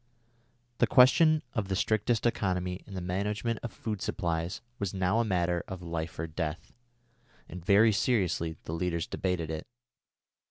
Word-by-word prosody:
The -, -, +4 dB
question 155 Hz, +5 st, +6 dB
of 110 Hz, -5 st, -1 dB
the 95 Hz, -, -1 dB
strictest 110 Hz, +4 st, +1 dB
economy 90 Hz, -5 st, 0 dB
in 100 Hz, -, -9 dB
the 90 Hz, -, -3 dB
management 105 Hz, +5 st, -2 dB
of 120 Hz, -, -4 dB
the -, -, -21 dB
food 105 Hz, -3 st, -4 dB
supplies 85 Hz, -4 st, -2 dB, 0.2 s
was 100 Hz, -1 st, -2 dB
now 95 Hz, +4 st, +2 dB
a -, -, +3 dB
matter 90 Hz, -4 st, 0 dB
of 95 Hz, -2 st, -7 dB
life 85 Hz, -1 st, -4 dB
or 80 Hz, -, -2 dB
death, 80 Hz, 0 st, -4 dB, 0.7 s
and 90 Hz, -2 st, -8 dB
very 105 Hz, +4 st, +6 dB
seriously 95 Hz, -7 st, 0 dB
the 80 Hz, -, -5 dB
leaders 85 Hz, -1 st, -1 dB
debated 90 Hz, -4 st, -2 dB
it. 80 Hz, 0 st, -5 dB
95 Hz, 160 wpm, -30 LUFS, 85-110 Hz, 0.7 s, question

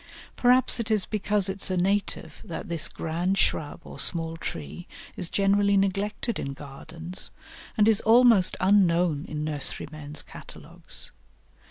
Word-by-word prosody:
Perhaps 250 Hz, 0 st, +3 dB
it 230 Hz, -1 st, -3 dB
is 215 Hz, -3 st, +2 dB
because 210 Hz, -2 st, 0 dB
it 195 Hz, +1 st, -4 dB
is -, -, +2 dB
a 185 Hz, -, -1 dB
native 195 Hz, +3 st, -1 dB
that 165 Hz, 0 st, -7 dB
this 165 Hz, -2 st, +3 dB
grand 175 Hz, +4 st, -2 dB
shrub 150 Hz, -6 st, -1 dB
or -, -, -11 dB
small 165 Hz, -1 st, -1 dB
tree 85 Hz, -, -7 dB, 0.3 s
is 180 Hz, -3 st, 0 dB
generally 200 Hz, 0 st, +2 dB
neglected 200 Hz, +4 st, -1 dB
in 140 Hz, -, -4 dB
gardens, 160 Hz, +5 st, -4 dB, 0.5 s
and 210 Hz, -1 st, +4 dB
is 220 Hz, -2 st, +4 dB
almost 225 Hz, -4 st, +5 dB
unknown 175 Hz, -5 st, +2 dB
in 150 Hz, 0 st, -5 dB
nurserymen's 150 Hz, 0 st, -2 dB
catalogues. -, -, -9 dB
185 Hz, 140 wpm, -26 LUFS, 160-205 Hz, 0.5 s, almost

